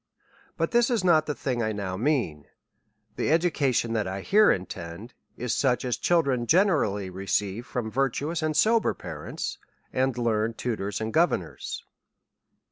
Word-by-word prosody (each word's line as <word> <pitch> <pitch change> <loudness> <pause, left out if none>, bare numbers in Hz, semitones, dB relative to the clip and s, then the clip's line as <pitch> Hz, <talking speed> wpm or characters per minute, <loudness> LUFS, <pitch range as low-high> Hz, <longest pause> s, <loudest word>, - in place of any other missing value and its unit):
But - - 0
this 240 +1 +4
is 235 -6 +1
not 160 -4 +4
the 150 - -2
thin«' 125 -3 -2
I 110 -1 0
now 100 -3 -3
mean: 110 - -1 0.7
the - - 0
education 145 -8 +2
that 110 -3 0
I 95 +1 -4
here 210 - +5
intend, 95 +4 -5 0.2
is 120 -2 -2
such 130 -2 +1
as 125 -3 0
children 135 -5 +1
generally 145 - +2
re 95 +2 -8
ceive 105 +5 -1
from 115 -3 -3
virtuous 140 +6 -1
and 155 -1 0
sober 225 0 +3
parents, - - -6 0.3
and 130 -1 +1
learned 115 -1 0
tu 120 -2 -1
tors 100 +1 -4
and 110 0 -3
governors. 160 - 0
120 Hz, 155 wpm, -26 LUFS, 105-155 Hz, 0.7 s, here